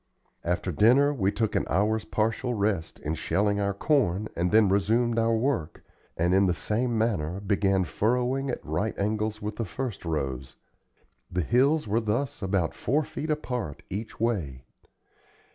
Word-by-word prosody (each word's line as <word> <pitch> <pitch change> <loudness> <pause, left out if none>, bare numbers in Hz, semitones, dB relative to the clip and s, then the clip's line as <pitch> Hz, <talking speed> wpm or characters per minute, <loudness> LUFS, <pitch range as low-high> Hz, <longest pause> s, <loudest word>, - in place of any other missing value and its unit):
After 90 +2 -1
dinner 125 - +4
we 100 -7 +1
took 110 -1 -1
an - - +1
hour's 110 +3 +1
partial 115 +3 -1
rest 100 -6 -1
in 75 - -2
shelling 100 +5 0
our 100 0 +1
corn 110 - +1
and 90 +1 +1
then 110 +1 +5
resumed 115 +5 +2
our 115 0 +2
work, 115 - -1 0.3
and 85 +2 +2
in 95 +1 +4
the 90 - +1
same 115 +4 -1
manner 95 -6 0
began 100 -1 +1
furrowing 125 - 0
at 125 - -4
right 80 +9 -2
angles 105 +1 -1
with 105 0 -4
the 115 - -1
first 115 +2 -5
rows. 70 -6 -3 0.8
The 90 0 0
hills 135 - +2
were 110 +3 +1
thus 115 +5 -2
about 95 -4 0
four 145 +7 0
feet 155 +2 -6
apart 125 - -3
each 105 +4 -5
way. 85 - -1
105 Hz, 160 wpm, -27 LUFS, 95-120 Hz, 0.8 s, then